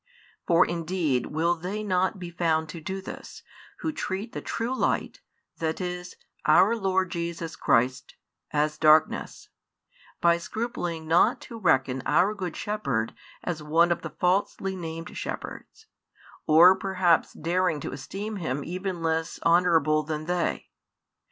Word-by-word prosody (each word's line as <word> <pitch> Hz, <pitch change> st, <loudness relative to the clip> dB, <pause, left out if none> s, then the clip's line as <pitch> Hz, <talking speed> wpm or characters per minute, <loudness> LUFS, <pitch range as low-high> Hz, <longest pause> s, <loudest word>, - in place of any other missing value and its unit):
For 170 Hz, -, +5 dB
indeed 165 Hz, -6 st, -1 dB
will 165 Hz, +3 st, +1 dB
they 185 Hz, +5 st, -4 dB
not 185 Hz, -1 st, +1 dB
be 175 Hz, -2 st, -7 dB
found 160 Hz, -2 st, 0 dB
to 165 Hz, +1 st, -7 dB
do 190 Hz, +4 st, -4 dB
this, -, -, -9 dB, 0.4 s
who 315 Hz, -, -1 dB
treat 210 Hz, -4 st, -4 dB
the -, -, -4 dB
True 235 Hz, +3 st, -2 dB
Light, -, -, -1 dB, 0.4 s
that 160 Hz, -1 st, -1 dB
is, 180 Hz, -1 st, -5 dB, 0.3 s
Our 190 Hz, +9 st, +5 dB
Lord 190 Hz, -4 st, 0 dB
Jesus 170 Hz, -1 st, -4 dB
Christ, 130 Hz, -1 st, +1 dB, 0.3 s
as 150 Hz, 0 st, 0 dB
darkness, 155 Hz, 0 st, +3 dB, 0.7 s
by 170 Hz, 0 st, +4 dB
scrupling 175 Hz, -6 st, -4 dB
not 175 Hz, +8 st, +4 dB
to 230 Hz, -, -9 dB
reckon 130 Hz, -7 st, +2 dB
our 200 Hz, +3 st, +3 dB
Good 185 Hz, -5 st, -5 dB
Shepherd 140 Hz, -, -2 dB, 0.3 s
as 170 Hz, -3 st, -3 dB
one 165 Hz, +3 st, +3 dB
of 170 Hz, -, 0 dB
the -, -, -5 dB
falsely 190 Hz, +1 st, 0 dB
named 165 Hz, -1 st, -6 dB
|75 -, -, -13 dB
shepherds, 445 Hz, -, -7 dB, 0.6 s
or 170 Hz, +4 st, +8 dB
perhaps 185 Hz, -3 st, +1 dB
daring 170 Hz, -1 st, 0 dB
to -, -, -5 dB
esteem 200 Hz, +10 st, -5 dB
Him 145 Hz, -6 st, -3 dB
even 180 Hz, 0 st, -4 dB
less 160 Hz, 0 st, -1 dB
honourable 165 Hz, -3 st, +4 dB
than 155 Hz, 0 st, -4 dB
they? 175 Hz, 0 st, -2 dB
170 Hz, 140 wpm, -26 LUFS, 160-190 Hz, 0.7 s, or